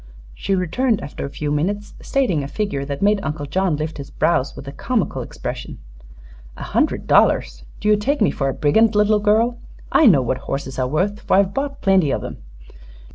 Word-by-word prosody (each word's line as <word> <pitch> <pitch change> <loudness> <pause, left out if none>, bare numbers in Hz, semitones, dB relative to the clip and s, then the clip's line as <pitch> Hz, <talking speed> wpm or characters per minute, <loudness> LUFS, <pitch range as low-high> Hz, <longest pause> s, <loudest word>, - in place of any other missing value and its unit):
She 195 - -1
returned 210 +6 0
after 140 - -6
a - - -8
few 145 +1 -4
minutes, 200 +8 -2
stating 245 - 0
a 140 - -4
figure 145 -4 -3
that 140 +4 -4
made 205 0 +3
Uncle 150 -4 -4
John 180 +3 0
lift 155 +1 -4
his 140 0 -7
brows 140 -4 0
with 140 - -10
a - - -5
comical 235 - -2
expression. - - -6 0.8
"A - - -7
hundred - - 0
dollars! - - +2
Do - - -3
you 210 - +6
take 275 +8 -1
me 210 - +3
for 135 -1 -1
a - - -2
brigand, 215 +9 +3
little 210 0 +3
girl? 225 +3 +2 0.3
I 315 - +5
know 145 - +5
what 130 +1 -1
horses 135 -1 -5
are 130 - +1
worth, 185 +9 -1
for - - +1
I've 195 0 +2
bought 280 0 -3
plenty 190 -6 +3
of - - -1
'em. - - -7
190 Hz, 200 wpm, -20 LUFS, 140-210 Hz, 0.8 s, you